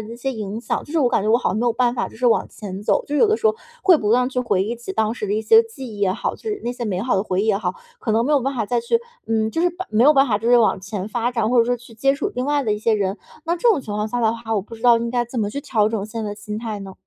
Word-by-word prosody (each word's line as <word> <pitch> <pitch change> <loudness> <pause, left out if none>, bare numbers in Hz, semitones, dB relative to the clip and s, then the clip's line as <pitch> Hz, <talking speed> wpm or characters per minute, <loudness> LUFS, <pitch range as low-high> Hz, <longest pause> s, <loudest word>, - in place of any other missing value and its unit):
一 230 - -8
些 270 +2 -3
影 215 0 -5
响， 230 - -2
就 295 - -11
是 330 - +2
我 255 -4 +3
感 195 - +1
觉 215 - -1
我 230 - +5
好 245 - 0
像 195 - -2
没 240 - 0
有 235 - +3
办 245 +1 +1
法 - - -2
就 - - -15
是 250 - 0
往 230 - +3
前 200 -1 -8
走。 - - +1
就 290 - -4
是 - - +2
有 460 - +6
的 435 - +3
时 445 - 0
候 440 - +3 0.3
会 365 -4 +6
不 210 0 -1
断 250 +2 +3
去 255 -1 -2
回 195 -6 +1
忆 230 +3 -3
起 230 -5 -7
当 220 +1 0
时 210 - -4
的 205 - -1
一 220 - -1
些 450 - +6
记 450 - -10
忆 - - -10
也 195 -2 +2
好， - - -3
就 - - -17
是 425 -2 -3
那 240 - -1
些 245 -1 -5
美 190 -4 -2
好 245 -4 +1
的 190 - +1
回 190 -1 -1
忆 - - -1
也 210 -3 +3
好， 185 -3 -2 0.2
可 220 - -3
能 230 +2 +2
没 300 - +1
有 285 - +4
办 270 +2 -2
法 225 -3 -1
再 240 +1 0
去 350 - +1 0.3
嗯， 220 -1 0
就 325 - -2
是 355 - +4
把 365 +2 -6
没 215 +2 +3
有 300 - +7
办 270 +1 +5
法 210 -3 +1
就 230 +2 -2
是 245 - +6
往 220 -4 +2
前 195 0 -5
发 240 +2 -1
展， 230 -3 0
或 250 - +3
者 230 - +6
说 245 +1 0
去 240 0 -16
接 275 +5 +2
触 400 +8 -2
另 250 - -2
外 290 0 +1
的 210 - +1
一 210 - -2
些 220 0 +2
人。 195 -1 -1 0.3
那 340 +1 0
这 475 - +2
种 315 - +2
情 210 - -7
况 210 +1 -1
下 245 +2 -2
的 225 -1 +3
话， 225 -1 -4
我 205 - +1
不 230 +3 -11
知 225 - -14
道 240 -1 +6
应 235 0 -2
该 240 -1 0
怎 240 +1 -6
么 205 -2 0
去 280 +6 -4
调 215 -6 +1
整 215 -3 -2
现 225 +1 -5
在 205 - -3
的 - - -5
心 210 0 -6
态 220 -3 -4
呢？ 195 -1 -8
230 Hz, 395 characters per minute, -21 LUFS, 215-255 Hz, 0.3 s, 有